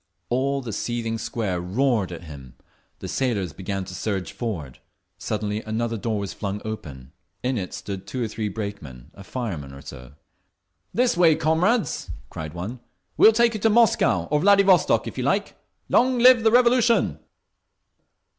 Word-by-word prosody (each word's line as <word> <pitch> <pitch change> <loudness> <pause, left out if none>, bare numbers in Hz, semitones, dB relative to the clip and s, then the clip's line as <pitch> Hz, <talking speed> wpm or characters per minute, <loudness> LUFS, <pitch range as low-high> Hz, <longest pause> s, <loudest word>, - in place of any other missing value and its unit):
All 135 +2 0
the 115 -3 -5
seething 115 +1 -3
Square 95 -8 -2
roared 105 +1 0
at 85 - -8
him; 70 -6 -11 0.4
the - - -7
sailors 105 - -1
began 95 +3 -4
to - - -9
surge 95 -4 -3
forward. 85 - -5 0.4
Suddenly 105 0 -2
another 115 +1 -2
door 110 0 -2
was 100 -1 -4
flung 100 -1 -4
wide; 80 -13 -7 0.3
in 130 +1 0
it 90 - -5
stood 100 -1 -7
two 130 -2 -3
or - - -1
three 110 0 -3
brakeman, 100 - -7
a 100 - -12
fireman 95 - -5
or 70 - -11
so. 65 +1 -11 0.8
"This 245 +1 +2
way, 170 -3 +5
comrades!" 165 - +1 0.2
cried 80 +1 -7
one. 100 +9 -5 0.4
"We - - +7
will - - +8
take 235 +1 +3
you 215 - -3
to 225 - +3
Moscow—or 225 -8 +3
Vladivostok, 195 0 +4
if - - -6
you - - -1
like! - - 0 0.3
Long 255 0 +3
live 250 0 +7
the 225 - +4
Revolution!" 235 - +3
115 Hz, 160 wpm, -24 LUFS, -, 0.8 s, will